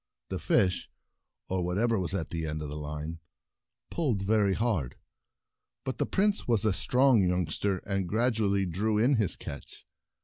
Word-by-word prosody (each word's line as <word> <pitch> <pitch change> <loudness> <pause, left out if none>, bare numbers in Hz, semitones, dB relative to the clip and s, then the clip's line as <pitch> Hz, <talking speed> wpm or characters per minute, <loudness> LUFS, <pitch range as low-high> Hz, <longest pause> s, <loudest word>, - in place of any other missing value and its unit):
The - - -3
fish 95 -2 +1 0.3
— - - -58
or 95 -1 -1
whatever 105 +5 +1
was 95 +1 -2
at 85 -5 -3
the 80 -1 -2
end 75 0 -3
of 75 - -5
the 75 - -6
line 75 +2 -5 0.3
— - - -61
pulled 125 - 0
very 100 -1 +2
hard, 105 - -1 0.9
but 130 - -4
the - - +1
Prince 205 +1 +1
was 115 -3 +3
a 105 - +3
strong 125 +1 +3
youngster, 90 +2 0
and 95 -3 -1
gradually 110 -3 +1
drew 105 +5 0
in 125 +5 +4
his 105 -5 +1
catch. 70 0 -9
100 Hz, 170 wpm, -29 LUFS, 85-115 Hz, 0.9 s, in